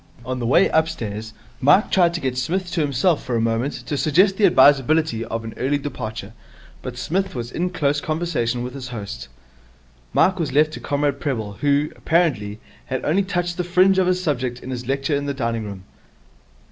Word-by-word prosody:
On 130 0 -3
the 120 - -2
way 125 - +5
upstairs 110 -10 -1 0.3
Mike 145 +10 +4
tried 175 -2 +3
to - - -1
get 130 -5 -2
Psmith 175 +8 -2
to 170 -2 0
himself 145 +3 +1
for 125 -2 -2
a - - +1
moment 115 +5 0
to 150 - -2
suggest 180 +7 +3
the 200 0 +5
advisability 145 -4 +4
of 115 0 -4
an 115 - -7
early 140 +3 +1
departure; 110 -7 -6 0.5
but 125 -1 -7
Psmith 190 +7 -2
was 120 -1 -5
in 180 +5 -1
close 145 -5 0
conversation 150 -8 -1
with 125 0 -6
his 135 -2 -7
host. 110 -5 -7 0.8
Mike 190 - +3
was 160 -4 -2
left 155 +2 +3
to - - -6
Comrade 145 -1 -1
Prebble, 110 -8 -3
who, 145 +1 +2
apparently, 130 -12 0 0.3
had 130 - -3
only 180 +6 +2
touched 175 -3 -2
the 180 - 0
fringe 185 +2 +4
of 185 - +2
his 185 0 +1
subject 125 -5 -2
in 130 - -6
his 125 -1 -5
lecture 135 +2 0
in 140 0 -2
the 140 - -2
dining 115 -4 -2
room. 100 -2 -8
140 Hz, 195 wpm, -22 LUFS, 120-170 Hz, 0.8 s, way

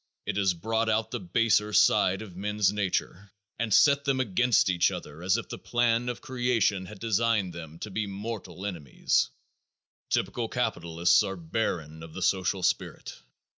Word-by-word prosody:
It - - -2
has 95 -3 +2
brought 110 +5 -1
out 110 0 0
the - - -3
baser 115 - +1
side 105 -1 +4
of 95 -5 -12
men's 105 +1 0
nature 100 -1 -2 0.3
and 115 -2 -1
set 140 +6 +5
them 135 -2 0
against 125 0 +2
each 85 -2 +3
other 75 +3 -8
as 95 +4 +2
if 115 - -5
the - - -6
plan 120 0 +1
of 120 - -5
creation 120 -8 0
had 105 - -10
designed 110 -4 +1
them 80 -2 -9
to 105 - -6
be 105 +1 -2
mortal 100 -2 -6
enemies. 75 -9 0 0.8
Typical - - -1
capitalists 85 +2 +2
are 95 -2 -3
barren 80 -3 -3
of 80 -1 -11
the 95 - -3
social 95 0 +1
spirit. - - -1
100 Hz, 165 wpm, -28 LUFS, 90-115 Hz, 0.8 s, set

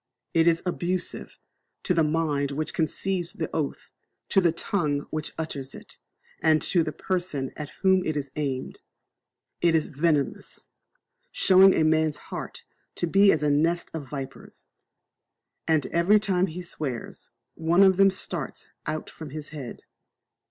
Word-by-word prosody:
It 165 0 +4
is 165 0 +3
abusive 180 0 -3 0.5
to 180 - +1
the 165 -2 +3
mind 150 -2 0
which 150 +3 -3
conceives 175 +2 -1
the 165 -7 -4
oath, 150 -3 -3 0.4
to 195 - +4
the 170 -2 +3
tongue 155 -4 -1
which 155 0 -3
utters 140 -4 -5
it, - - -13 0.4
and 155 -1 +4
to 175 - +2
the - - -1
person 175 -8 -2
at 150 -1 -6
whom 190 -1 +4
it 155 -3 -1
is 140 -2 -4
aimed. 135 -3 -3 0.8
It 170 -1 +4
is 160 - +2
venomous, 150 -1 -1 0.6
showing 190 0 +6
a 160 - +3
man's 155 -1 +2 0.2
heart - - -6 0.3
to - - 0
be 195 +4 +5
as 150 - 0
a 150 - +3
nest 165 +4 +1
of 150 -5 -6
vipers; 135 -1 -8 1.0
and 160 -3 +2
every 180 +5 +4
time 190 -3 +1
he 180 +1 -6
swears, 145 -8 -5 0.2
one 170 +4 +3
of 190 -2 +5
them 195 0 +6
starts 190 - -5 0.2
out 155 - -3
from 155 -2 -9
his 150 +1 -6
head. 140 -5 -8
160 Hz, 150 wpm, -26 LUFS, 150-180 Hz, 1.0 s, showing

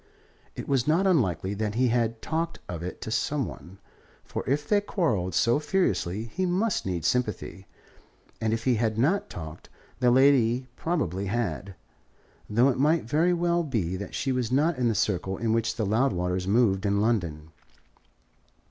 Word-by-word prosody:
It - - -6
was 135 -2 +1
not 165 +5 +3
unlikely 100 - +1
that 105 0 -2
he 125 +1 +2
had 115 -1 0
talked 165 +1 -2
of 85 -2 -5
it 90 +1 -6
to 110 - -5
some 135 +4 0
one, 90 +3 -10 0.5
for - - -5
if 145 +2 0
they 205 -1 +3
quarrelled 110 - -1
so 120 - +3
furiously 150 - 0
he 185 - -1
must 190 - 0
need 85 -4 -2
sympathy; 105 -5 -2 0.7
and 110 -1 +1
if 115 0 -1
he 125 -3 +2
had 110 -1 0
not 160 - +1
talked, 80 -1 -9 0.3
the 125 -1 +4
lady 130 -1 +4
probably 100 - -2
had, 100 -3 -3 0.7
though 120 +6 +4
it 130 - -1
might 155 +4 +3
very 155 +9 +2
well 175 0 +1
be 110 - -2
that 100 +2 -6
she 135 - -1
was 125 -2 -1
not 150 +5 +2
in 125 -2 0
the 115 - +1
circle 95 -1 -1
in 115 -1 0
which 115 -1 0
the 110 - -1
Loudwaters 95 -5 0
moved 100 -2 +3
in 100 -1 +1
London. 85 -9 -1
115 Hz, 170 wpm, -27 LUFS, 100-145 Hz, 0.7 s, the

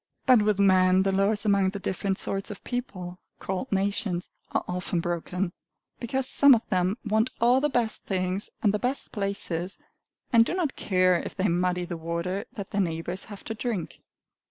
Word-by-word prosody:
But 250 -4 +6
with 210 -1 +2
men 185 -1 +5
the 195 - +1
laws 200 +2 +1
among 200 -2 +3
the 200 +1 -5
different 190 0 -2
sorts 195 0 -1
of 205 - -8
people, 185 -8 -5 0.2
called 190 +8 -4
nations, 195 -2 0 0.2
are - - -1
often 180 -1 -2
broken, 175 +2 -2 0.5
because 260 +2 -1
some 280 -1 +7
of 225 - -4
them 185 +1 +1
want 220 +3 +2
all 245 +3 +4
the 295 - +2
best 240 -4 -1
things 185 +1 -1
and 205 -2 +4
the 210 - 0
best 255 +4 -2
places, 195 -3 -2 0.6
and 230 -1 +8
do 335 - -2
not 335 -7 -1
care 185 -2 +2
if - - -7
they 195 0 +1
muddy 180 0 0
the 170 -1 -5
water 170 +4 -3
that 200 -1 -7
their 205 - +1
neighbors 165 +1 -2
have 205 -2 -10
to 225 - -4
drink. 220 -6 -4
195 Hz, 180 wpm, -27 LUFS, 180-220 Hz, 0.6 s, and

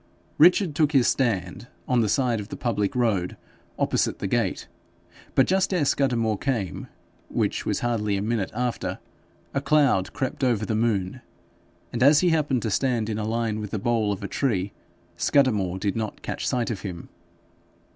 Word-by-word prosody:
Richard 175 +1 +5
took 150 +1 +1
his 130 -4 +4
stand 110 -4 -1 0.2
on 125 -2 +3
the 110 - +1
side 120 0 +1
of 100 - -6
the - - -7
public 110 -4 -1
road 105 -8 0 0.4
opposite - - 0
the - - -5
gate; - - -1 0.7
but 135 - +5
just 190 +1 +1
ere 175 -6 +1
Scudamore 115 -7 +1
came, 115 - -2 0.4
which - - -1
was - - 0
hardly 105 -4 0
a - - -2
minute 110 -3 -1
after, 120 +1 -2 0.6
a 140 - 0
cloud 140 -11 +2
crept 135 -1 -3
over 115 -5 +1
the 110 - -2
moon, 110 0 0 0.7
and, 120 - -3
as 145 +3 +6
he 180 - +3
happened 150 -6 +1
to 110 - -1
stand 120 -2 0
in 110 0 -2
a 105 - -2
line 115 -1 -1
with 105 -1 -5
the 110 - -3
bole 110 0 +1
of 100 -1 -4
a - - -2
tree, 100 -8 -1 0.4
Scudamore 105 -10 +2
did 100 0 -2
not 110 -2 -4
catch - - -3
sight 120 -2 0
of 105 - -5
him. 90 -4 -7
115 Hz, 175 wpm, -25 LUFS, 105-135 Hz, 0.7 s, as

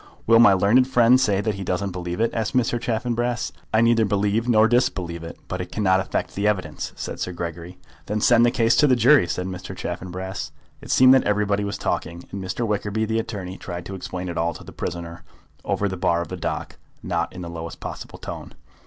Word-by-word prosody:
"Will 115 0 +6
my 115 -4 +8
learned 105 +7 +4
friend 125 0 +5
say 100 -5 +2
that 110 0 -1
he 100 0 -6
doesn't 95 +2 -2
believe 90 0 -5
it?" 115 +1 +2
asked 115 +3 -2
Mr. 120 -1 +1
Chaffanbrass. 120 +1 -1 0.2
"I 110 - +3
neither 115 -1 +4
believe 105 +3 0
nor 110 -1 +5
disbelieve 95 -8 0
it; 85 - -8
but 90 0 -3
it 90 - -7
cannot 95 -3 +2
affect 95 - -3
the 100 +1 0
evidence," 105 -3 -2
said - - -6
Sir 90 - -2
Gregory. 85 +1 -6 0.3
"Then 105 +1 -1
send 120 +2 +5
the 120 - +5
case 120 -2 +2
to 150 - +5
the 130 - +5
jury," 125 -3 +5
said 90 +1 -2
Mr. 95 -1 -7
Chaffanbrass. 95 +2 -5 0.3
It - - -12
seemed 130 0 +7
that 130 - +4
everybody 105 0 +1
was 100 0 -3
talking, 85 +2 -3
and 100 -1 -5
Mr. 95 +6 -2
Wickerby, 105 0 -1
the 110 +1 0
attorney, 95 -5 -5
tried 85 -1 -6
to 95 - -7
explain 90 -1 -5
it 85 -2 -3
all 85 0 0
to - - -10
the - - -11
prisoner 85 0 -6 0.4
over 100 - 0
the 95 -1 -4
bar 85 -1 +1
of - - -12
the - - -4
dock, - - -4 0.3
not 85 -2 -1
in 90 -1 -8
the - - -6
lowest 85 0 -7
possible - - -7
voice. - - -8
100 Hz, 220 wpm, -23 LUFS, 90-115 Hz, 0.4 s, my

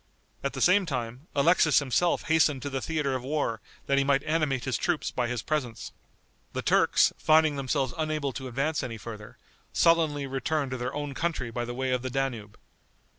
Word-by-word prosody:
At 140 - -1
the 135 - -5
same 185 +1 +4
time, 125 +1 -4
Alexis 155 0 +4
himself 145 +5 +2
hastened 155 -4 +2
to 145 - -4
the 135 0 -2
theater 150 -4 -1
of 130 - -2
war 130 -5 -2 0.2
that 140 0 +2
he - - +3
might 140 0 +2
animate 150 -5 0
his 130 - -1
troops 175 -3 -1
by 125 -1 -1
his 120 -2 -3
presence. 125 -8 -3 0.6
The - - -3
Turks, - - +4
finding 155 -1 +4
themselves 135 -1 -1
unable 155 -3 -2
to 130 0 -6
advance 140 +5 -1
any 120 -4 -5
further, 105 -1 -9 0.4
sullenly 160 -4 +3
returned 135 +1 -2
to 130 - -2
their 125 +2 -4
own 145 -1 -4
country 155 -6 -2
by 120 +1 -3
the 120 0 -6
way 130 0 -1
of 125 -1 0
the 130 - -4
Danube. 125 -6 -3
135 Hz, 190 wpm, -27 LUFS, 125-155 Hz, 0.6 s, same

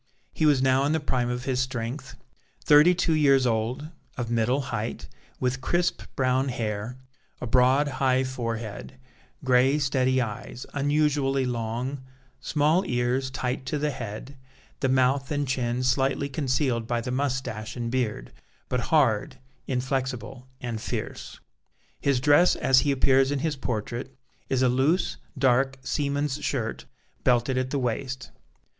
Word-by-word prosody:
He 155 - +2
was 140 -3 +4
now 130 +1 +3
in 145 - +1
the 160 - +1
prime 125 -5 -1
of 125 0 -3
his 130 -2 0
strength, 130 +1 -3 0.5
thirty 150 +4 +7
two 170 -2 +1
years 140 -4 +4
old, 120 +6 -1 0.3
of 120 -2 -3
middle 120 +3 +2
height, 110 +1 -3 0.3
with 130 +1 -1
crisp 175 +6 0
brown 130 0 +1
hair, 110 0 -3 0.4
a - - -4
broad 130 +4 +4
high 130 -1 +1
forehead; 115 -2 -5 0.5
gray, 130 +2 +4
steady 130 -2 +1
eyes, 120 +1 -5
unusually 145 -2 +1
long; 120 +3 -3 0.4
small 155 +5 +2
ears 125 +2 0
tight 130 0 -3
to 150 - -1
the 150 +1 0
head; 125 +1 -7 0.4
the 135 - +1
mouth 130 +1 +2
and 145 -1 -1
chin 125 -1 -1
slightly 135 +2 +1
concealed 130 -4 0
by 120 -1 0
the 120 +2 -4
moustache 130 -5 -2
and 120 -2 -3
beard, 115 - -2 0.4
but 125 - 0
hard, 130 -3 +2 0.3
inflexible, 130 0 -3
and 115 -3 -4
fierce. - - -5 0.6
His 140 -3 +2
dress, 145 +6 +5
as 130 0 +4
he 145 - +1
appears 135 0 +3
in 145 - 0
his 155 -2 0
portrait, 120 +1 -4 0.3
is 130 -1 +2
a - - +5
loose, 135 +9 +1 0.2
dark, 135 0 +2
seaman's 145 0 -1
shirt, 90 - -2 0.4
belted 125 +1 +2
at 130 0 -1
the 140 - -1
waist. 130 +1 -3
130 Hz, 145 wpm, -26 LUFS, 125-140 Hz, 0.6 s, thirty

